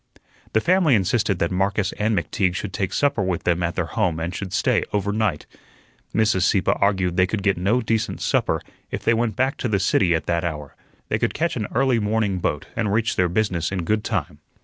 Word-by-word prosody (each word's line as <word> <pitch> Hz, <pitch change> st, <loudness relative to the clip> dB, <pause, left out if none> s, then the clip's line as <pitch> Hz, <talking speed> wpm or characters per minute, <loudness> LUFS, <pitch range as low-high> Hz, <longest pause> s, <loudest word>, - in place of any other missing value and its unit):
The 110 Hz, -, +3 dB
family 175 Hz, -5 st, +4 dB
insisted 100 Hz, 0 st, +1 dB
that 85 Hz, -1 st, 0 dB
Marcus 95 Hz, +2 st, 0 dB
and 105 Hz, 0 st, 0 dB
McTeague 90 Hz, +2 st, 0 dB
should 95 Hz, 0 st, -4 dB
take 95 Hz, 0 st, -2 dB
supper 140 Hz, -4 st, +1 dB
with 95 Hz, -3 st, -1 dB
them 85 Hz, 0 st, +1 dB
at 85 Hz, 0 st, -1 dB
their -, -, 0 dB
home 80 Hz, -3 st, -1 dB
and 85 Hz, +2 st, -3 dB
should 95 Hz, 0 st, -5 dB
stay -, -, +1 dB
over 100 Hz, 0 st, 0 dB
night. 105 Hz, -8 st, -1 dB, 0.7 s
Mrs. 110 Hz, -4 st, +2 dB
Sieppe 95 Hz, +1 st, +3 dB
argued 95 Hz, -3 st, +1 dB
they 95 Hz, 0 st, +4 dB
could 100 Hz, 0 st, -3 dB
get 100 Hz, -2 st, +3 dB
no 100 Hz, +8 st, +1 dB
decent 110 Hz, -1 st, -1 dB
supper -, -, 0 dB, 0.3 s
if -, -, -5 dB
they 115 Hz, -, +3 dB
went 115 Hz, -2 st, 0 dB
back 130 Hz, +5 st, 0 dB
to -, -, -2 dB
the 105 Hz, -3 st, +1 dB
city 90 Hz, -2 st, +2 dB
at 80 Hz, -, -2 dB
that 85 Hz, -1 st, 0 dB
hour; 75 Hz, -4 st, -4 dB
that -, -, -35 dB
they -, -, 0 dB
could -, -, -1 dB
catch 170 Hz, +2 st, 0 dB
an 110 Hz, -4 st, -2 dB
early 130 Hz, -1 st, +3 dB
morning 105 Hz, -3 st, 0 dB
boat -, -, -2 dB
and 105 Hz, -3 st, 0 dB
reach 110 Hz, +2 st, +1 dB
their 90 Hz, -1 st, +2 dB
business 90 Hz, -4 st, 0 dB
in 95 Hz, -3 st, -2 dB
good 105 Hz, +5 st, 0 dB
time. 95 Hz, -, -3 dB
100 Hz, 220 wpm, -23 LUFS, 90-110 Hz, 0.7 s, family